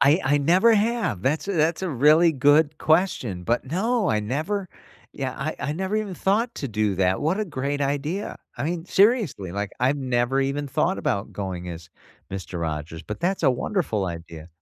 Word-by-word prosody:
I 145 +8 +5
I 145 +2 +3
never 185 +10 +4
have, 215 - 0
that's 150 - 0
a - - 0
that's 165 +2 +1
a 185 - -1
really 155 +5 +5
good 145 +2 +3
question, 155 - +1
but 120 +5 0
no, 205 - 0
I 105 - +1
never 160 - -2 0.4
yeah, 130 -2 -4
I 155 +3 -3
I 145 - -2
never 190 +6 -2
even 210 -3 -2
thought 220 +7 0
to 140 - -4
do 105 -2 0
that, 95 0 +1
what 175 +8 0
a - - 0
great 145 -4 -3
idea. 145 +8 -2 0.2
I - - -3
mean, 165 +1 -2
seriously, 195 - +2
like, 100 0 -3
I've 135 +3 +2
never 130 0 0
even 140 +2 -1
thought 165 +7 0
about 100 +1 -2
going 90 -3 -5
as 85 0 -8 0.4
Mister 95 -2 -5
Rogers, 80 0 -4
but 105 - -7
that's 185 +1 0
a 135 - +5
wonderful 125 - -1
idea. 85 -1 -7
145 Hz, 190 wpm, -24 LUFS, -, 0.4 s, I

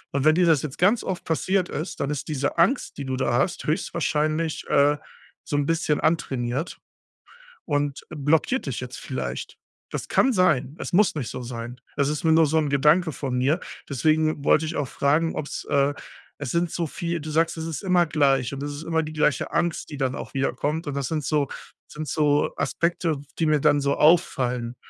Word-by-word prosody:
Und 140 - +1
wenn 155 0 +6
dir 180 0 +4
das 160 -5 +4
jetzt 145 -3 -5
ganz 210 +6 +3
oft 185 -1 -4
passiert 185 +3 0
ist, 155 +5 -5
dann 140 - -1
ist 145 - -4
diese 145 0 -2
Angst, 245 +11 +2
die 140 - -4
du 130 0 -2
da 120 -2 0
hast, 140 +8 0
höchstwahrscheinlich, 155 -1 -1
äh, 145 +1 +4 0.5
so 145 - -3
'n 145 - +1
bisschen 160 -2 +1
antrainiert 135 -2 -1 0.9
und 145 -1 -1
blockiert 155 - +1
dich - - -3
jetzt - - -7
vielleicht. - - -5 0.3
Das - - -4
kann 265 - +3
sein. 155 - +2
Es - - -5
muss 200 -1 +4
nicht 140 -6 -3
so 130 - -6
sein. 120 0 -7 0.2
Es 140 0 +2
ist 150 +1 -3
mir 160 - +5
nur 160 0 +6
so 155 +2 +1
'n 155 -2 +1
Gedanke 150 +5 +3
von 130 -3 -3
mir, 140 +7 +2 0.3
deswegen 155 +2 +1
wollte 155 - +4
ich 160 +1 -4
auch 145 -3 -1
fragen, 155 +4 +1
ob's, 150 - -5
äh 140 +1 +2 0.5
es 135 - -3
sind 170 0 0
so 170 -2 -2
viel 170 +2 -3
du 155 - -6
sagst, 165 +2 +1
es 160 - -4
ist 160 -4 -4
immer 180 -2 +3
gleich 140 -4 +2
und 140 - -5
es 145 - -3
ist 145 - -7
immer 165 -1 0
die 155 - -6
gleiche 150 -4 +1
Angst, 170 -2 -1
die 145 - -7
dann 130 -1 -1
auch - - -7
wiederkommt, 145 +4 -1
und 145 - -2
das 140 -2 -2
sind 155 -2 -2
so 145 -2 +1 0.4
sind 155 0 -6
so 145 +1 +2
Aspekte, 170 -2 0 0.2
die 165 - +2
mir 150 -1 +3
dann 145 -1 +4
so 140 0 +1
auffallen. 125 -7 +2
150 Hz, 205 wpm, -24 LUFS, 140-165 Hz, 0.9 s, wenn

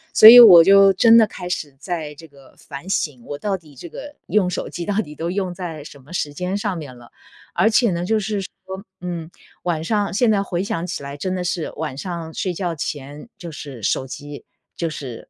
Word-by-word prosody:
所 215 - +11
以 245 +1 +11
我 180 -8 +10
就 195 +1 +6
真 230 +4 +6
的 220 -2 +5
开 180 -1 -8
始 150 -6 -4
在 160 -3 -5
这 165 - -13
个 140 -2 -20
反 140 +6 -10
省， 145 -9 -2
我 145 - -6
到 195 +4 -2
底 155 -5 -19
这 170 +6 -10
个 290 - -10
用 195 -4 +1
手 - - -4
机 170 -1 -6
到 205 - -2
底 150 -7 -10
都 165 +3 -4
用 185 -1 -2
在 165 -5 -7
什 140 -1 -13
么 150 +7 -15
时 145 -4 -3
间 180 +5 -3
上 205 -4 -3
面 135 -6 -9
了。 120 -1 -17 0.4
而 220 - +3
且 230 -2 +3
呢， 175 +1 -3
就 220 +3 +1
是 210 0 -3
说， - - -7 0.5
嗯， 170 -3 -5 0.3
晚 165 -3 -2
上 205 -1 -1
现 230 +2 +2
在 200 -2 +2
回 180 -1 -3
想 170 -3 -3
起 170 -5 -5
来 140 +1 -7
真 185 +5 -3
的 180 - -3
是 175 -2 -3
晚 150 -3 -5
上 170 -2 -6
睡 185 -2 -3
觉 175 -1 -3
前 145 +3 -6
就 170 -2 -9
是 140 -5 -9
手 130 - 0
机 145 +2 -9 0.3
就 165 -1 -2
是 130 -6 -8
175 Hz, 245 characters per minute, -20 LUFS, 150-195 Hz, 0.5 s, 所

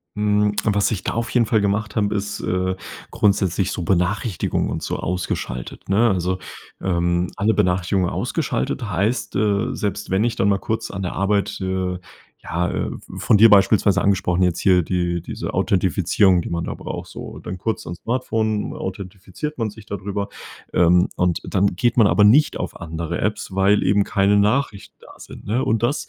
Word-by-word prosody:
Hm, 105 0 +2
was 100 -2 +1
ich 95 -4 -3
da - - -2
auf 115 +1 -2
jeden 120 -3 +2
Fall 110 - +3
gemacht 105 +1 -1
habe, 105 -2 +1
ist, 105 0 -3
äh, 90 +1 -1 0.3
grundsätzlich 95 -2 +1
so - - -4
Benachrichtigungen 95 +3 0
und - - -4
so - - -2
ausgeschaltet, 85 -8 -4
ne? 110 +5 +4
Also, 90 0 -1 0.4
ähm, 85 -1 0
alle 105 +2 +1
Benachrichtigungen 90 -1 +1
ausgeschaltet 65 - -2
heißt, 105 +6 -1
äh, 105 +2 +1
selbst 100 -2 -3
wenn 95 +3 +2
ich 120 -1 0
dann 100 - +2
mal 100 - +2
kurz 110 +3 -3
an 95 - -5
der 90 - -3
Arbeit, 100 +1 0
äh, 95 -1 -2 0.5
ja, 90 +2 -1
äh- - - -2 0.3
von 100 +3 +3
dir 115 +2 +8
beispielsweise 100 -1 +4
angesprochen- 95 -2 +1
jetzt 90 -1 +1
hier 90 -3 +4
die 85 0 -1
diese - - -6
Authentifizierung, 95 0 +2
die - - -6
man 85 -1 -2
da - - -4
braucht - - -6
so - - -8
dann 95 - -6
kurz 110 +5 -3
ans 85 +1 -6
Smartphone, 110 -3 -1
authentifiziert 95 +9 -6
man 115 -3 -1
sich 105 0 -14
da 100 - -3
drüber. 100 +1 -4 0.5
Ähm, 90 +1 +4
und 90 -1 +1
dann 100 +1 +2
geht 120 +6 +1
man 115 - +6
aber 105 - +4
nicht 140 +9 +5
auf - - -5
andere 85 +1 -4
Apps, 105 -2 -2
weil 100 +2 +3
eben 100 +2 +3
keine 100 +1 +2
Nachrichten 105 0 0
da - - -16
sind, - - -12
ne, 120 +6 0
und 110 0 +1
das 120 +5 0
100 Hz, 180 wpm, -21 LUFS, 90-105 Hz, 0.5 s, dir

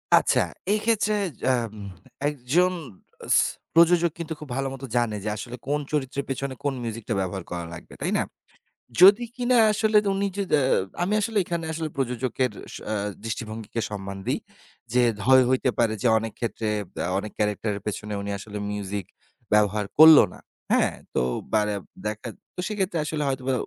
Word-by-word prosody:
আচ্ছা। - - +4 0.3
এক্ষেত্রে 215 0 +1 0.3
জাম 120 -4 +1 0.6
একজন 150 +6 +2 0.6
স - - +7 0.4
প্রযোজক 170 0 +5
কিন্তু 165 -1 -4
খুব 150 - -10
ভালো 135 0 -1
মতো 135 0 -7
জানে 120 -3 +1
যে 110 - -1
আসলে 120 +3 -6
কোন 145 +1 +1
চরিত্রের 140 -2 -1
পেছনে 135 0 -3
কোন 145 -1 0
মিউজিকটা 115 0 -4
ব্যবহার 95 0 -3
করা 85 -1 -3
লাগবে, 85 - -11
তাই - - 0
না? - - +2 0.8
যদি 200 +6 +8
কিনা 250 0 +2 0.2
আসলে 215 0 +2 0.2
উনি 200 +1 0
যদা 195 -6 +1 0.4
আমি 195 +4 +1
আসলে 220 +1 -3
এখানে 170 -1 -3
আসলে 160 0 -3
প্রযোজকের 125 -1 -1 0.2
স - - -5 0.2
আ - - 0 0.3
দৃষ্টিভঙ্গিকে 115 0 -4
সম্মান 100 -1 -5
দেই। - - +1 0.5
যে 125 - +4 0.3
হয় 130 0 +7
হইতে 130 0 +2
পারে 115 -2 +3
যে - - +2
অনেক 110 0 -5
ক্ষেত্রে 115 -2 -2 0.4
আ - - 0
অনেক 105 +1 -5
ক্যারেক্টারের 105 0 -1
পেছনে 105 0 -3
উনি 100 - -4
আসলে 105 +1 -7
মিউজিক 100 -2 -4 0.5
ব্যবহার 105 0 +3
করল 155 0 +11
না, - - -12 0.3
হ্যাঁ, - - +3 0.2
তো - - +2 0.3
বারে 105 -1 +2 0.3
দেখাত 110 +2 -4 0.2
তো - - -4
সেক্ষেত্রে 195 -5 -1
আসলে 150 0 -2
হয়তোবা 130 -1 -1
130 Hz, 160 wpm, -25 LUFS, 105-165 Hz, 0.8 s, করল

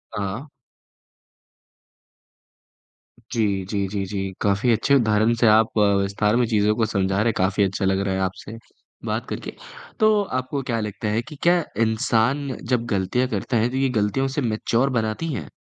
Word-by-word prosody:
हाँ। 105 +7 -4 2.9
जी, 100 -4 0
जी, 100 -2 -1
जी, 100 0 -3
जी। 95 -1 -4
काफ़ी 105 +4 +2
अच्छे 135 +5 +3
उदाहरण 110 -2 +3
से 115 - +4
आप 110 +1 +4
विस्तार 100 +1 +2
में 125 0 +3
चीज़ों 105 -1 +2
को 115 - +1
समझा 95 -2 0
रहे 110 - +1
हैं। 115 - +2
काफ़ी 95 +2 +2
अच्छा 95 +1 -1
लग 95 0 +2
रहा 100 -1 -1
है - - -2
आपसे 95 +4 -4 0.5
बात - - -2
करके। - - -5 0.5
तो 215 -1 +4
आपको 130 -3 -3
क्या 115 -1 0
लगता 105 0 -4
है 110 +2 0
कि 150 +4 -11
क्या 175 0 +4 0.2
इंसान 115 +4 +1 0.2
जब 120 -2 +1
गलतियाँ 100 +7 0
करता 125 -1 -2
है 115 +2 +2
तो, 130 - -6
ये 135 -1 +2
गलतियों 105 +6 0
उसे 135 +2 -2
मैच्योर 115 +2 0
बनाती 110 +9 -3
है? 80 - -5
110 Hz, 170 wpm, -23 LUFS, 100-125 Hz, 2.9 s, से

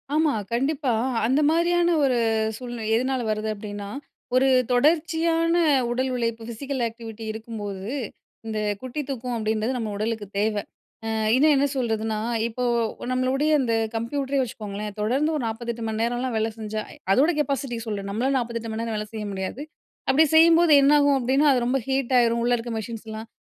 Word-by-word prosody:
ஆமா 310 -1 +3 0.2
கண்டிப்பா, 270 +1 0 0.3
அந்த 265 +6 +2
மாதிரியான 345 +1 +2
ஒரு 260 -3 +2 0.4
சூழ்நிலை 240 -1 -6
எதனால 255 +2 0
வருது? 215 0 -2
அப்படின்னா, 205 -1 -7 0.5
ஒரு 260 +1 +4 0.2
தொடர்ச்சியான 330 +4 +2 0.3
உடல் 255 +2 0
உழைப்பு 230 -2 -2
ஃபிசிக்கல் 260 +3 -4
ஆக்டிவிட்டி 225 -1 -9
இருக்கும்போது, 215 -3 -6 0.6
இந்த 215 -1 -2 0.2
குட்டி 260 +3 -4
தூக்கம் 250 -2 -3
அப்படின்றது 220 +3 -1
நம்ம 220 -3 -3
உடலுக்கு 220 0 -2
தேவ. 215 +1 +1 0.5
அ - - -3 0.3
இன்னும் 300 +4 +5
என்ன 275 +1 +3
சொல்றதுன்னா, 220 -3 -1 0.3
இப்போ 235 +2 -4 0.5
நம்மளுடைய 260 +4 +1
இந்த 235 -3 0 0.2
கம்ப்யூட்டரே 270 +4 -1
வச்சுக்கோங்களேன், 210 -3 -5
தொடர்ந்து 265 +9 +1
ஒரு 290 - -2
48 230 +1 -4
மணி 220 0 -2
நேரம்லாம் 245 +1 -1
வேலை 220 +1 0
செஞ்சா, 215 -1 -4 0.3
அதோட 280 - +4
கெப்பாசிட்டி 275 -4 -1
சொல்ற, 205 -2 -3
நம்மளால 250 +7 0
48 230 -2 -3
மணிநேரம் 225 0 -3
வேலை 210 0 -4
செய்ய 215 -1 -4
முடியாது. 190 +7 -4 0.5
அப்படி 310 +4 +5
செய்யும்போது 330 0 +6
என்னாகும் 285 0 +5
அப்படின்னா, 265 +4 +2
அது 245 -2 +1
ரொம்ப 250 +3 +1
ஹீட் 265 -1 0
ஆயிரும். 235 0 +2
உள்ள 245 +1 +2
இருக்கிற 230 0 -5
மெஷின்ஸ்லாம், 220 0 -7
240 Hz, 150 wpm, -24 LUFS, 220-275 Hz, 0.6 s, செய்யும்போது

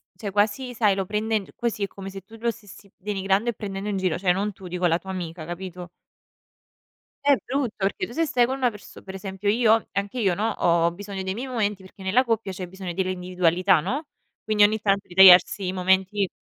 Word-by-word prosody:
cioè, 205 -3 -6
quasi 210 +6 0
sai, 215 -4 +2
lo 195 -1 -2
prendendo 210 0 -2
così 230 -3 -2
è - - 0
come 195 0 -9
se 195 0 -8
tu 205 +5 -16
lo 235 +1 0
stessi 205 -2 -15
denigrando 195 +2 0
e - - -1
prendendo 200 -1 -5
in 200 - -1
giro, 185 -4 0
cioè, 180 0 +2
non 200 +3 -1
tu, 190 -1 -11
dico 180 +1 -2
la 165 0 +2
tua 190 - -12
amica, 170 -3 -6
capito? 175 0 -7 1.4
È 285 0 +6
brutto, 260 -3 -2
perché 195 0 -1
tu - - -11
se 330 +5 +1
stai 245 -6 +2
con 260 +2 -2
una 255 -2 +1
perso 210 -2 -13
per 190 - -9
esempio, 195 +1 -3
io 220 0 +4
ho 225 - -2
anche 200 +5 -3
io 195 -5 +2
no, 215 +5 0
ho 170 -5 +2
ho 170 - 0
bisogno 195 +1 -6
dei 190 0 -3
miei 245 +5 -5
momenti 210 -5 -1
perché 190 +1 -14
nella 205 +8 +3
coppia 225 -5 -1
c'è 185 0 -6
bisogno 185 -1 -7
dell'individualità, 180 -1 +1
no, 265 - -3 0.4
quindi 215 -1 +2
ogni 210 +1 +5
tanto 200 -1 0
ritagliarsi 185 +1 +7
i 180 - -1
momenti 190 +2 +1
195 Hz, 220 wpm, -24 LUFS, 185-215 Hz, 1.4 s, ritagliarsi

